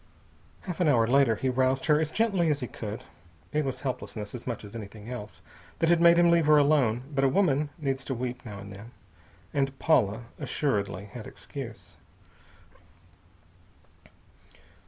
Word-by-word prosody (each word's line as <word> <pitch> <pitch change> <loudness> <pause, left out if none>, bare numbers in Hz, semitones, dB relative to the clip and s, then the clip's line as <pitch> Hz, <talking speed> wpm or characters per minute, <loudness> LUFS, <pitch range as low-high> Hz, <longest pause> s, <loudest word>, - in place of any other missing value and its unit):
Half 180 -3 -6
an 175 - +3
hour 120 -6 +4
later 125 -1 +4
he 130 - -2
roused 130 +1 +1
her 150 -1 +4
as 155 - -1
gently 195 -7 +2
as 145 -1 0
he - - -1
could. 110 -2 -6 0.5
It 150 0 +2
was 135 -2 -4
helplessness, 110 -6 -5
as 125 0 -8
much 120 -3 -3
as 105 - -11
anything 105 +1 -8
else, 105 -4 -8 0.3
that 165 - +2
had 170 -1 +4
made 170 0 +7
him 170 0 +5
leave 165 -3 +3
her 150 0 +7
alone; 140 -5 +3
but 135 -1 +1
a 135 - +5
woman 150 -3 +2
needs 135 -4 -2
to 130 - -2
weep 125 0 -4
now 105 -4 -8
and 100 0 -9
then. 105 +5 -11 0.6
And 135 -1 0
Paula 120 -9 +2 0.2
assuredly 105 - -1
had 110 +2 -9
excuse. 125 -6 -9
130 Hz, 165 wpm, -28 LUFS, 115-150 Hz, 0.6 s, made